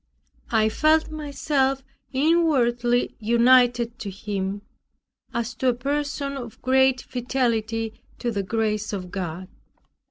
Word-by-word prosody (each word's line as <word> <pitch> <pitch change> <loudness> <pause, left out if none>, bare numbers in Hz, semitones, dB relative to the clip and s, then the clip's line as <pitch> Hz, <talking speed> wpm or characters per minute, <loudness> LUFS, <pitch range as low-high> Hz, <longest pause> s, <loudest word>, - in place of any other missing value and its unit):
I 220 -2 +3
felt 310 +8 +2
myself 280 -3 -1 0.3
inwardly 260 -6 +2
united 240 +1 +4
to 205 - -5
him, 200 0 -4 0.7
as 235 +1 -2
to 260 +3 -2
a 245 - +3
person 280 +2 -2
of 240 -4 -8
great 265 0 +3
fidelity 230 -3 -2 0.2
to 240 - -2
the 200 -3 -1
grace 215 +1 -1
of 185 -3 -5
God. 185 -1 -4
240 Hz, 115 wpm, -24 LUFS, 220-265 Hz, 0.7 s, united